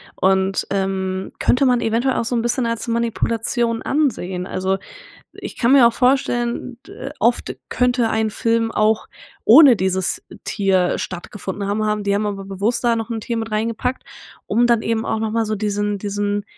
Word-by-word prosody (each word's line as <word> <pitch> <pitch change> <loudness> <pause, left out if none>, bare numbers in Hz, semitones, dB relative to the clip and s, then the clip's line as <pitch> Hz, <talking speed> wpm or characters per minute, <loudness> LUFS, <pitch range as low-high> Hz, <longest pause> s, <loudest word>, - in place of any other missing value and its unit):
und, 190 0 +1
ähm, 190 -1 -2
könnte 260 +2 +3
man 250 -2 +3
eventuell 235 +4 +1
auch - - 0
so 245 - -3
'n 230 - +1
bisschen 240 +2 0
als 230 +1 -3
Manipulation 230 0 -1
ansehen. 190 -11 -1
Also 190 +1 -1 0.6
ich - - -9
kann 240 +1 +2
mir 260 -4 +7
auch 235 - -1
vorstellen, 245 -1 0
d 270 - -8
oft 235 +1 +1
könnte 245 -2 +1
ein 220 0 0
Film 230 +1 0
auch 215 0 +1 0.4
ohne 260 0 +8
dieses 190 0 -1 0.2
Tier 190 -3 +1
stattgefunden 195 +2 -5
haben 215 +1 0
haben. 210 -1 -1
Die 200 0 +1
haben 205 +1 0
aber 200 -1 -3
bewusst 200 +6 -2
da 235 -1 +2
noch 225 +1 -4
'n 225 -2 -3
Tier 235 +1 -3
mit 225 0 -3
rein 215 +2 0
gepackt, 250 +3 -3 0.4
um 235 +4 +2
dann 235 -2 +3
eben 225 0 -1
auch 220 - -1
noch 220 -1 -2
mal 225 0 0
so 215 - -2
diesen 205 0 -1
diesen 205 0 -2
220 Hz, 180 wpm, -20 LUFS, 200-235 Hz, 0.6 s, ohne